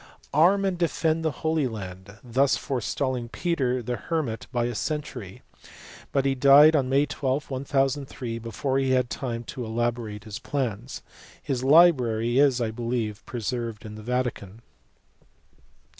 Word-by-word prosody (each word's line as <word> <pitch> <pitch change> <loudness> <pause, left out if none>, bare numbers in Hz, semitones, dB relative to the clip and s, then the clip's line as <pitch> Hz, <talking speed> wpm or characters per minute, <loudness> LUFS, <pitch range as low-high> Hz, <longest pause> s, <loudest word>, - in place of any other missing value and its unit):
141 160 +5 +6
arm 200 0 0
and 190 -2 0
defend 165 -1 +1
the 160 - +2
Holy 160 -3 +1
Land, 100 -2 -8
thus 130 +3 +2
forestalling 130 -1 -2
Peter 130 -6 -1
the 120 +1 -3
Hermit 150 -10 -3
by 120 -2 0
a 120 - -2
century, 125 - -5 0.7
but 135 -1 +1
he 135 - +3
died 140 +4 +7
on 135 -3 +1
May 140 +2 +3
12, 140 0 -2
1003 135 -3 -1
before 115 +4 -2
he 135 -1 0
had 125 -1 +1
time 120 -3 -3
to 125 +2 -6
elaborate 115 -2 -2
his 110 0 -7
plans. 125 -3 -4 0.4
His 130 -3 -3
library 130 -6 +4
is 140 -3 +4
I 115 -2 -1
believe 115 -2 -3
pre 125 -3 -5
served 115 -2 -4
in 105 - -8
the 110 - -9
Vatican. 115 -3 -3
125 Hz, 150 wpm, -26 LUFS, 115-140 Hz, 0.7 s, died